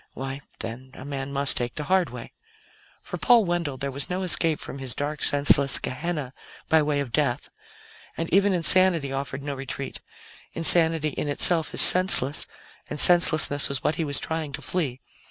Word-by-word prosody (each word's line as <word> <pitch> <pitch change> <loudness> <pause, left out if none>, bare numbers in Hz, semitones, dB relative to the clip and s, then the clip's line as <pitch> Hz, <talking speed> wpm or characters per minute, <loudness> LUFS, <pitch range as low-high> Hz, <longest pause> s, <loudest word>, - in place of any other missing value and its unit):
Why, 135 +1 -7 0.2
then 120 +3 -8
a 130 - -11
man 140 -1 -6
must 140 0 +2
take 120 0 -4
the 150 - -3
hard 185 +2 0
way. - - -11 0.7
For - - -8
Paul 240 -4 +4
Wendell, 170 -6 -3
there 140 +1 -5
was 140 +1 -1
no 185 +1 -3
escape 165 -3 0
from 140 - -8
his 130 -3 -8
dark, 145 +1 -5
senseless 140 -1 +3
Gehenna 140 -1 -5 0.4
by 160 -1 +4
way 145 -1 -1
of 135 -4 -7
death, 135 -2 -2 0.7
and 165 - -3
even 200 +1 +3
insanity 175 -4 +4
offered 135 0 -6
no 145 0 -5
retreat; 135 0 -7 0.5
insanity 165 -2 +3
in 150 - -5
itself 160 +3 +3
is - - +4
senseless, 180 -7 +3 0.4
and - - -6
senselessness 155 -5 +4
was 140 -1 -3
what - - 0
he 165 +1 -3
was 145 -2 -3
trying 160 -2 -5
to - - -6
flee. 140 -8 -4
145 Hz, 175 wpm, -24 LUFS, 135-165 Hz, 0.7 s, Paul